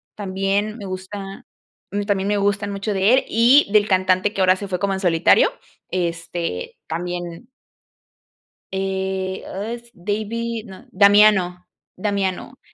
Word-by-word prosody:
también, 200 +2 -1
me 205 - -8
gusta, 195 +1 -7 0.5
mm, 205 0 -1
también 200 -1 -1
me 205 0 +1
gustan 205 0 0
mucho 200 +1 -3
de 195 +4 +3
él 265 - +1
y 240 +6 +5
del 210 0 +4
cantante 185 +1 +2
que 195 - -2
ahora 185 0 +5
se 200 +1 -7
fue 180 -2 -3
como 200 0 0
en 190 - -2
solitario, 170 -4 +4 0.4
este 170 - -3
también 175 +4 -5 1.3
eh, 190 0 -2
ah, 205 +4 -5
s 235 0 -10
David, 220 +4 -3
no, 190 -1 -12
Damiano, 200 -3 +4 0.3
Damiano, 200 +5 -2
195 Hz, 135 wpm, -21 LUFS, 185-210 Hz, 1.3 s, y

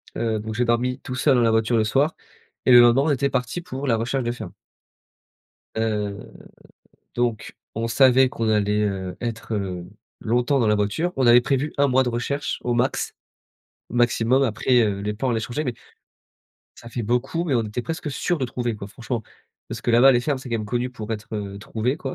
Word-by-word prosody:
heu, 110 -2 -1
donc 110 +1 -5
j'ai 125 - +1
dormi 120 +2 +1
tout 130 - -6
seul 135 +1 +3
dans 120 - +3
la 115 -1 +3
voiture 110 +1 +2
le 110 - +3
soir 135 +8 +1 0.5
et 130 - +5
le 120 - +10
lendemain, 120 +2 +6
on 155 - +1
était 140 0 +1
parti 125 +8 -2
pour 140 -5 -6
la 115 -4 +2
recherche 120 +3 -1
de 120 - -1
ferme. 100 -7 -8 1.2
Heu, 105 -3 -1 1.0
donc 120 -3 -1 0.2
on 115 +1 -1
savait 130 +2 +5
qu'on 115 -3 -2
allait, 105 0 +2
heu, 95 -3 -3
être, 115 -1 -4
heu, 90 -4 -3 0.3
longtemps 125 +4 +1
dans 115 - +2
la 105 - +4
voiture, 105 - -1
on 130 -2 +2
avait 120 +1 +7
prévu 140 +3 -1
1 140 0 +4
mois 130 0 +3
de 125 - -1
recherche 140 +5 -2
au 120 - 0
max, 125 +3 0 0.8
maximum 120 +2 +2
après, 120 +1 +2
heu, 100 -3 0
les 105 +1 -2
plans 125 +2 -1
allaient 115 - 0
changer 120 +7 -3
mais 125 - -2 1.0
ça 115 - -11
fait 120 - -3
beaucoup 125 +9 -1
mais 145 -6 0
on 115 - +2
était 110 +3 -4
presque 160 0 -4
sûr 175 +5 -1
de 130 - -1
trouver, 120 -2 -3
quoi, 100 - -7
franchement. 120 +3 -5 0.5
Parce - - -6
que 120 - -1
là-bas, 125 +3 +7
les 120 - +3
fermes, 140 +1 -1
c'est 130 - -9
quand 115 - 0
même 105 - -5
connu 125 +3 -1
pour 110 -3 -8
être, 105 0 -6
heu, 100 -1 -5
trouvé, 115 +5 -2
quoi. 135 -4 -5
120 Hz, 210 wpm, -23 LUFS, 110-130 Hz, 1.2 s, le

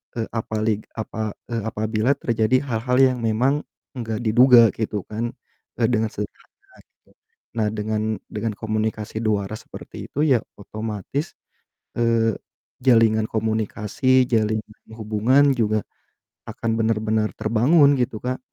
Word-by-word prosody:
eee, 115 -1 -2
apalig 110 -1 -1 0.2
apa 110 -1 -4 0.2
e - - -3 0.2
apabila 110 +3 0
terjadi 115 +1 +1
hal-hal 125 +2 0
yang 125 -1 -2
memang 120 +6 +2 0.4
enggak 115 -3 -3
diduga 120 +2 +7 0.2
gitu 105 -2 -2
kan 115 +2 -2 0.5
dengan 110 -2 +1
sederhana 105 0 -10
gitu. - - -35 0.5
Nah 110 -2 +2
dengan 110 0 -2 0.3
dengan 110 0 -3
komunikasi 110 -1 -2
dua 105 -2 +1
arah 110 - -5
seperti - - -10
itu - - -5
ya 125 - +5 0.2
otomatis, 110 - -5 0.7
eee, 115 -2 +2 0.5
jalinan 110 -3 +4
komunikasi, 110 +4 +1
jalinan 110 -1 -1
hubungan 110 +7 +3
juga 110 -2 +1 0.7
akan 115 - -3
bener-benar 110 -1 +1
terbangun 140 +7 +4
gitu 120 -3 -1
Kak, 130 +1 -2
110 Hz, 120 wpm, -22 LUFS, 110-120 Hz, 0.7 s, diduga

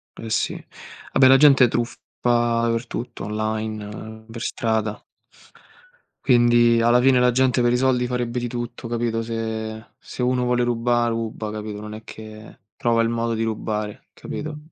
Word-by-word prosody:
Eh 115 - -8
sì, - - -1 0.5
vabbè 135 - +5
la 135 +1 +7
gente 135 -3 +6
truffa 120 0 -2 0.2
dappertutto 120 0 0
online, 110 0 -4
per 115 0 -8
strada. 110 -3 -2 1.2
Quindi, 120 -2 +5
alla 120 +1 +4
fine 130 0 +5
la 125 0 +4
gente 130 0 +2
per 120 0 +3
i - - +3
soldi 125 -1 +2
farebbe 125 -1 -2
di 120 - -3
tutto 120 0 -6
capito, 115 -1 -1
se 110 -1 -4
se 125 - -6
uno 125 0 +1
vuole 125 0 +1
ruba, 120 0 +1
ruba, 115 -2 -3
capito, 105 -1 -6
non 105 0 -8
è 110 +1 -11
che 110 0 -11 0.2
trova 120 -3 +2
il 115 - +1
modo 115 0 -1
di 115 0 -1
rubare, 105 -1 -3
capito? 150 +1 -6
115 Hz, 155 wpm, -22 LUFS, 110-125 Hz, 1.2 s, la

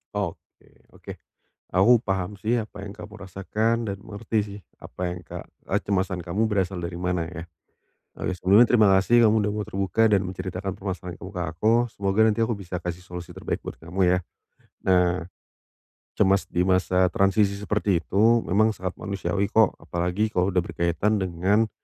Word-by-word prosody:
Oke 100 -5 -2 0.6
oke - - -10 0.6
aku 95 +7 +5
paham 95 +1 -2
sih 115 +4 0
apa 105 -2 -8
yang 100 - -7
kamu 105 -2 -10
rasakan 110 +5 -1
dan 100 - -3
mengerti 110 +1 -3
sih 100 0 -9 0.2
apa - - -13
yang 90 - -5
ka - - -7 0.3
kecemasan 95 -2 -1
kamu 90 +6 -1
berasal 95 -3 -1
dari 85 0 -5
mana 90 -2 -1
ya. 85 -1 -7 0.7
Oke, - - -3
sebelumnya 95 +5 +5
terima 115 -3 +4
kasih 115 +4 +5
kamu 110 - +3
sudah 105 - 0
mau 105 -1 -3
terbuka 100 +4 +1
dan 100 -3 +3
menceritakan 95 +1 -4
permasalahan 90 -2 -5
kamu 95 - -8
ke 90 - -2
aku. 105 +7 +2 0.2
Semoga 100 +1 -1
nanti 110 0 +2
aku 115 0 +1
bisa 90 -3 -6
kasih 90 0 -5
solusi 90 -1 -9
terbaik - - -3
buat - - -8
kamu 85 +4 -8
ya. 90 0 +3 0.7
Nah, 90 -2 +2 0.9
cemas 95 -1 +4
di 90 +1 +1
masa 95 0 +3
transisi 95 +2 +2
seperti 100 -3 0
itu 115 +6 +3
memang 110 +3 +2
sangat 95 0 -5
manusiawi 100 0 -2
kok. 110 -1 +3
Apalagi 90 +5 -1
kalau 90 +2 +2
udah 95 - 0
berkaitan 90 +4 0
dengan 95 +5 +1
95 Hz, 170 wpm, -25 LUFS, 90-105 Hz, 0.9 s, aku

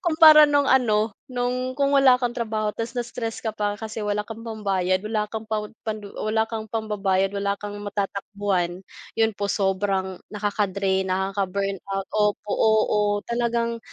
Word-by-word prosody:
Kumpara 315 -2 +8
nung 285 -1 +3
ano 220 -5 +3 0.2
nung 255 +1 -2
kung 280 0 +2
wala 265 -2 +6
kang 245 -1 -1
trabaho 215 -2 -2
tapos 230 0 -4
na-stress 235 -1 -4
ka 220 -2 -4
pa 205 -1 -2
kasi 220 -1 -5
wala 210 0 -1
kang 225 0 -8
pambayad, 195 -5 0
wala 210 0 -2
kang 220 0 -5
pan 215 -1 -3 0.2
panlu 215 -2 -4
wala 220 +1 +1
kang 220 -1 -5
pambabayad 200 -3 0
wala 200 0 -1
kang 205 0 -7
matatakbuhan, 200 -3 -2 0.3
'yun 225 0 +3
po 200 0 -3
sobrang 195 -1 0
nakaka-drain, 200 -2 -1
nakaka-burnout 195 0 -2
opo, 210 0 0
oo, 220 0 +3 0.3
talagang 235 0 0
210 Hz, 145 wpm, -24 LUFS, 200-230 Hz, 0.3 s, Kumpara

